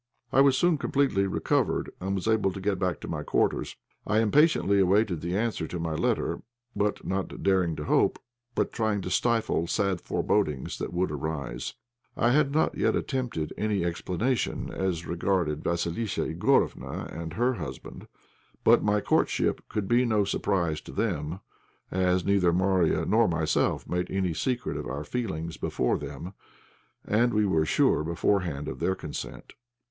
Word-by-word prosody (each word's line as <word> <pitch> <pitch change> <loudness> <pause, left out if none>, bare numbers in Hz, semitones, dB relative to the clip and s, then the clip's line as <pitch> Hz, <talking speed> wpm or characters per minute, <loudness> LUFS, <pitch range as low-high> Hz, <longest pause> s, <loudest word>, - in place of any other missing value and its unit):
I 135 - +6
was 135 -1 +5
soon 175 -2 +3
completely 135 -11 +1
recovered, 95 - 0
and 95 +1 -1
was 95 +2 -3
able 110 -3 +2
to 95 - -6
go 100 +2 0
back 90 -3 -1
to - - -6
my - - -3
quarters. - - 0 0.3
I 105 - +2
impatiently 110 - +4
awaited 95 -2 +2
the 90 +2 -1
answer 110 -7 -1
to 90 - -5
my 80 -1 -2
letter, 80 - 0 0.3
not 95 -2 -2
daring 95 -4 +2
to 75 - -5
hope, - - +2 0.4
but - - 0
trying 110 -3 0
to 90 - -5
stifle 115 -8 +1
sad 95 -2 0
forebodings 75 -11 -1
that - - -4
would 90 -1 0
arise. 70 -5 -4 0.4
I 120 +1 +3
had 145 +1 +3
not 155 +2 +1
yet - - +1
attempted 125 - -2
any 105 -4 0
explanation 95 +8 -1
as 90 -3 -2
regarded 85 -3 0
Vassilissa 85 +5 -1
Igorofna - - +1
and 80 -1 -5
her 125 +3 +1
husband. - - -8 0.6
But - - +6
my 105 0 +2
courtship - - +1
could 105 -3 -2
be 120 +3 +4
no 110 -4 +2
surprise 90 -5 0
to - - -11
them, 75 +5 -2 0.5
as 90 -1 +1
neither 100 -3 +3
Marya 90 -3 +2
nor 110 +4 +4
myself 80 -3 0
made 90 0 -2
any 95 -3 0
secret 125 +8 -2
of - - -5
our 70 +4 -4
feelings 85 -4 -4
before 65 - 0
them, 90 +4 -7 0.7
and 120 +2 +2
we 105 0 +3
were 80 -5 +2
sure 75 - +3
beforehand 85 -2 0
of - - -5
their 95 - +1
consent. 75 -5 -7
95 Hz, 160 wpm, -27 LUFS, 85-110 Hz, 0.7 s, I